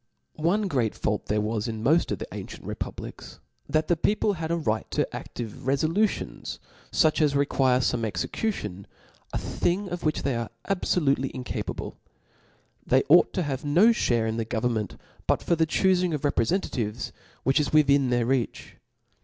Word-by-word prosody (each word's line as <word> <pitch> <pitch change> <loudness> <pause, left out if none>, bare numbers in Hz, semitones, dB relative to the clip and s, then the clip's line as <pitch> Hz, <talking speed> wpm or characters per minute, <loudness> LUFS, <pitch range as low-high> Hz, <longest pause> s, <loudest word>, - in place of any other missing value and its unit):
One 195 +6 +2
great 125 - 0
fault 105 - -2
there 105 +1 +1
was 110 +1 -1
in 110 -1 -4
moil 135 +6 +5 0.2
of - - -1
the - - -5
ancient - - -8
republics, - - -7 0.3
that 155 +2 +1
the 175 - +3
people 205 +5 +1
had 160 -3 -4
a 170 - +2
right 110 -10 -1
to - - 0
aAive 120 -2 -5
refolutibnSf 160 +11 0 0.3
fuch 155 -1 +3
as 145 -2 +3
require 135 -2 +3
fome 120 -1 0
execution, 105 - -3 0.4
a - - -1
xhing 190 +3 -1
of 175 -1 -3
which 155 -1 0
they 135 -3 0
are 115 -1 -3 0.2
abfolutely 150 -8 +1
incapable. 125 -1 -5 0.8
They 130 +1 +3
ought 170 +4 +7
to 185 - 0
have 135 -4 -3
no 175 +11 +5 0.2
(bare 120 -2 +2
in 110 0 -1
the 115 - 0
government 110 -3 -1 0.3
but - - +2
for 170 - +2
the 160 0 +2
chufing 180 -1 +2
of 145 - -4
reprefentatives, 120 - 0 0.3
which 135 +3 +3
is 150 - 0
within 140 -3 +4
their 120 -1 +2
reach. 130 -1 -2
140 Hz, 165 wpm, -26 LUFS, 115-170 Hz, 0.8 s, ought